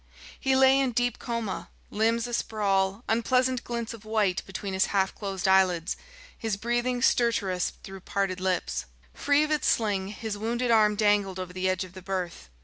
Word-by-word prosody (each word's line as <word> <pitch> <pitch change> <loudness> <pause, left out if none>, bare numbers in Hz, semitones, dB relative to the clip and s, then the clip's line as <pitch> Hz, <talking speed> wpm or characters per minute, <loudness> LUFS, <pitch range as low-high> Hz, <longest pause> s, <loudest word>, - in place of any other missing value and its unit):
He 265 -1 +2
lay 265 +1 +6
in 265 -3 +1
deep 245 +1 0
coma, 230 -5 -4 0.2
limbs 225 +2 +1
a 240 - -6
sprawl, 200 -2 0
unpleasant 250 +3 +1
glints 235 -1 -4
of 225 -2 -11
white 215 -4 +1
between 195 0 -5
his 190 - +2
half 195 -1 +1
closed 195 -3 -3
eyelids, 185 -2 +3 0.4
his 220 -3 -2
breathing 240 +3 -1
stertorous 200 -8 +2
through 195 0 -9
parted 190 0 -2
lips. 185 - -1 0.3
Free 290 +1 +2
of 305 - -2
its 300 -2 +1
sling, 205 -4 +1
his 210 0 -5
wounded 235 +2 0
arm 215 -2 +5
dangled 205 -3 +2
over 185 -1 -6
the 185 +1 0
edge 185 0 0
of 185 -1 -11
the 185 - -10
berth. 180 - -4
210 Hz, 175 wpm, -27 LUFS, 190-235 Hz, 0.4 s, lay